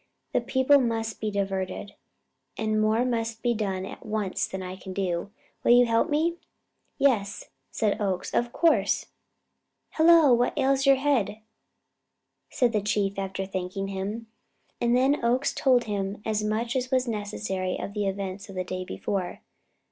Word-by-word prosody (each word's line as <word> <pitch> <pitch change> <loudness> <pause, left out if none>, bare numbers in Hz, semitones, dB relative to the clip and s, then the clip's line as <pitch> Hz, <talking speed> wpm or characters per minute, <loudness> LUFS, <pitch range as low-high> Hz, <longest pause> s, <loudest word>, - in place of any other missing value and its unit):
The - - +2
people 260 +2 +4
must 225 -3 -2
be 215 - 0
diverted, 195 0 -3 0.6
and 215 -1 0
more 220 +3 +2
must 230 -2 -2
be 240 -1 +2
done 195 -4 -2
at - - -9
once 210 -3 -2
than 190 0 -5
I 185 0 -6
can 190 0 -9
do. 185 -1 -2 0.3
Will 240 - +6
you 245 0 +7
help 230 -1 +2
me?" 325 +3 +1 0.6
"Yes," 220 -8 +1 0.2
said 215 0 -1
Oakes. 190 -3 -2
"Of 240 0 +1
course!" 335 +4 +2 0.9
"Hello, 320 -4 +6
what 240 +1 +1
ails 270 +1 +2
your 275 - +8
head?" 260 -6 0 1.1
said 245 -2 +2
the 210 - +2
Chief, 200 -1 0
after 195 0 -3
thanking 190 +1 -4
him. 200 +4 -4 0.6
And 240 +1 +3
then 270 +2 +2
Oakes 250 +4 +2
told 255 -3 +3
him 200 -2 -3
as 215 -1 0
much 225 +3 -1
as 255 -1 -1
was 255 -1 +1
necessary 205 -4 -3
of 200 - -5
the 205 -1 -1
events 195 +1 -4
of 195 - -9
the 185 - -1
day 185 0 -4
before. 185 0 -4
215 Hz, 160 wpm, -26 LUFS, 195-245 Hz, 1.1 s, your